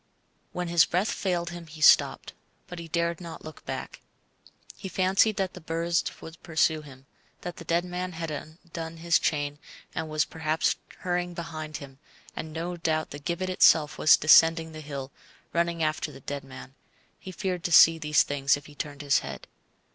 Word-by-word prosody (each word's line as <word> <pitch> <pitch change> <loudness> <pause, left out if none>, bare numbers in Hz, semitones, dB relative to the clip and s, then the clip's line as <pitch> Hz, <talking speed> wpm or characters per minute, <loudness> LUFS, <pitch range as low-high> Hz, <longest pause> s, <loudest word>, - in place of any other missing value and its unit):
When 180 0 -3
his 170 -1 +5
breath 185 +5 0
failed 175 -3 -2
him 170 -1 -9
he 155 0 -12
stopped, 150 - +4 0.3
but 180 - -8
he 170 - -8
dared 170 +1 -1
not 165 -2 -9
look 155 -1 -10
back. - - -6 0.7
He 195 - -7
fancied 190 +4 +3
that 190 -2 -1
the - - -10
birds 165 +1 0 0.2
would 160 0 -11
pursue 160 -1 +1
him, 135 -3 -14 0.4
that 175 - -6
the 165 - -8
dead 170 +2 0
man 180 0 -4
had 165 -1 -4
undone 160 +2 -7
his 170 +1 +2
chain 145 -1 -1 0.3
and 160 -1 -4
was 155 0 +1
perhaps 160 -1 0 0.3
hurrying 175 -1 -2
behind 155 -3 -6
him, 135 -1 -12 0.4
and 160 - -5
no 170 +3 -4
doubt 160 -2 -1
the 145 - -7
gibbet 175 +4 -2
itself 155 -4 +4
was 155 - +7
descending 160 +1 +5
the 155 0 -8
hill, 140 -2 -6 0.4
running 170 -1 0
after 155 0 -1
the 135 - -13
dead 140 -1 -5
man; 130 0 -11 0.5
he 190 - -9
feared 180 -1 -3
to 175 - -1
see 165 0 +8
these 150 -1 +3
things 140 -1 +1
if 145 - -13
he 150 - -13
turned 145 0 -6
his 140 -1 +3
head. - - -8
165 Hz, 185 wpm, -27 LUFS, 155-175 Hz, 0.7 s, see